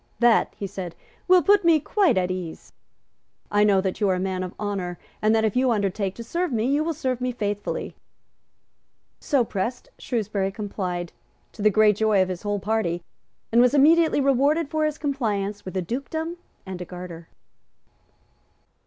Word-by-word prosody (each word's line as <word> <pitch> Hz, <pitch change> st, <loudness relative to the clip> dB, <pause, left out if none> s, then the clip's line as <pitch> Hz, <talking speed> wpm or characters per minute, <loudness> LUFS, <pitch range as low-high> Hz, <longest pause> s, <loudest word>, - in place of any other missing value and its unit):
"That," 235 Hz, 0 st, +4 dB
he 200 Hz, -, -4 dB
said, 190 Hz, -3 st, -6 dB, 0.3 s
"will 365 Hz, -2 st, +6 dB
put 405 Hz, +3 st, +4 dB
me 335 Hz, -2 st, +5 dB
quite 375 Hz, -, +2 dB
at 180 Hz, 0 st, +1 dB
ease. 180 Hz, -3 st, -6 dB, 0.8 s
I 205 Hz, 0 st, +4 dB
know 200 Hz, -2 st, +4 dB
that 190 Hz, +2 st, -3 dB
you 205 Hz, -, +3 dB
are 185 Hz, -, +2 dB
a -, -, -2 dB
man 185 Hz, 0 st, -2 dB
of 185 Hz, -1 st, -5 dB
honour, 195 Hz, -4 st, -3 dB, 0.2 s
and 215 Hz, +1 st, +3 dB
that, 220 Hz, 0 st, +2 dB
if 215 Hz, -, -1 dB
you 255 Hz, 0 st, +3 dB
undertake 200 Hz, -3 st, -1 dB
to 235 Hz, -, -7 dB
serve 340 Hz, +7 st, -2 dB
me, 225 Hz, -2 st, 0 dB
you 285 Hz, +4 st, +2 dB
will 325 Hz, 0 st, -2 dB
serve 255 Hz, -4 st, -2 dB
me 250 Hz, 0 st, 0 dB
faithfully." 205 Hz, -3 st, -3 dB, 1.2 s
So 275 Hz, -4 st, +2 dB
pressed, 225 Hz, +5 st, -4 dB
Shrewsbury 210 Hz, -4 st, -2 dB
complied, 185 Hz, -4 st, -4 dB, 0.4 s
to 215 Hz, -, -10 dB
the 215 Hz, -, +5 dB
great 210 Hz, 0 st, +4 dB
joy 215 Hz, -2 st, +3 dB
of 185 Hz, 0 st, +2 dB
his 180 Hz, -1 st, -4 dB
whole 205 Hz, -1 st, -1 dB
party; 195 Hz, -5 st, -1 dB, 0.5 s
and 235 Hz, +1 st, +5 dB
was 250 Hz, +3 st, +4 dB
immediately 320 Hz, +3 st, +5 dB
rewarded 280 Hz, +3 st, +2 dB
for 310 Hz, 0 st, 0 dB
his 305 Hz, -1 st, -1 dB
compliance 210 Hz, -9 st, -2 dB
with 185 Hz, 0 st, -5 dB
a 185 Hz, -, 0 dB
dukedom 315 Hz, -, -4 dB, 0.3 s
and 185 Hz, -2 st, -6 dB
a -, -, -4 dB
garter. 175 Hz, -2 st, -9 dB
215 Hz, 180 wpm, -24 LUFS, 190-270 Hz, 1.2 s, will